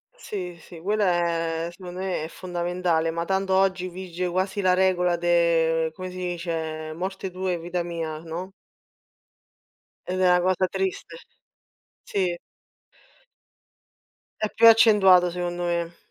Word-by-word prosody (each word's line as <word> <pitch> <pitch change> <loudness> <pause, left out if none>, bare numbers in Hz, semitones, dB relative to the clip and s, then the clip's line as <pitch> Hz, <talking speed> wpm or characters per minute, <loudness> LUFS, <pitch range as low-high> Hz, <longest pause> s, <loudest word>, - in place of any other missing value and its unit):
Sì, 185 - -6
sì, 165 +1 -12
quella 205 +3 0 0.6
è - - -5
secondo 180 0 -9
me 185 -4 -2
è - - -4
fondamentale, 175 -2 -1
ma 170 +1 -2
tanto 190 0 0
oggi 190 -1 +2
vige 180 0 -5
quasi 190 +3 -1
la 185 -1 +4
regola 180 -1 +2
de 165 -2 +2
come 185 -1 -6
si 185 - -9
dice, 165 -3 -4
morte 190 +2 -4
tua 185 0 -3
e 175 - -2
vita 175 +1 -3
mia, 165 -2 -4
no? 170 +4 -6 1.5
Ed 185 +1 -3
è 180 - +5
una 180 0 +4
cosa 185 0 +2
triste, 385 - -3 0.9
sì. 180 -3 -1 2.0
É 215 - 0
più 230 0 +5
accentuata 195 -6 +6
secondo 175 0 -3
me 170 -1 -2
180 Hz, 135 wpm, -25 LUFS, 170-190 Hz, 2.0 s, accentuata